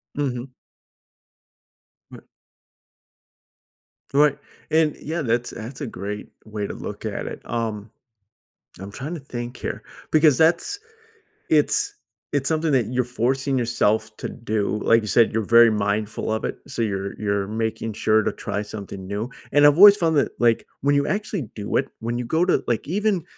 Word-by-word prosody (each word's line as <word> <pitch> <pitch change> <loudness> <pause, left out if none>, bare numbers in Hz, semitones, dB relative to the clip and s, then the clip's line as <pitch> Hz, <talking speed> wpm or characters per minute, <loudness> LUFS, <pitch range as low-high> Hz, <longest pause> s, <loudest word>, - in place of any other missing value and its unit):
Mhm. 130 -3 -2 1.6
Bu - - -13 1.9
Right. 145 0 +4 0.3
And, 155 -2 +3
yeah, 160 +2 -3
that's 120 -2 0
that's 120 +5 -8
a 140 - -3
great 105 0 -6 0.2
way 105 -1 -4
to - - -6
look - - -7
at - - -3
it. - - -7
Um, 110 -2 -3 0.9
I'm 100 +2 -8
trying 140 +9 -5
to 165 - -6
think 120 -2 -6
here, - - -5 0.3
because 155 -3 +5
that's 170 - +2 0.7
it's 410 0 +2 0.4
it's 140 -1 +1
something 160 0 +1
that 125 -6 +2
you're 125 +2 0
forcing 130 +3 0
yourself 115 -3 +1
to - - -4
do. 105 0 -2
Like 115 0 +5
you 105 - -6
said, 115 +2 +4
you're 110 0 0
very 115 +2 +7
mindful 105 +1 -1
of 110 - -2
it, - - -3
so - - -4
you're 100 -3 -2
you're 100 -2 -1
making 110 +1 -3
sure 110 +1 +2
to - - 0
try 105 - -3
something 100 -2 -8
new. 105 +5 -3 0.2
And 145 +1 +6
I've 145 +1 +6
always 200 +2 +10
found 165 -5 +2
that, 140 - +2
like, 120 -1 +3 0.2
when 145 +1 +2
you 140 0 +2
actually 205 -4 -2
do 105 -1 -2
it 135 - 0
when 115 +1 -3
you 120 - -3
go 160 +8 +1
to 185 - +2
like, 115 -2 -1
even, 200 +1 0
120 Hz, 165 wpm, -23 LUFS, 110-145 Hz, 1.9 s, always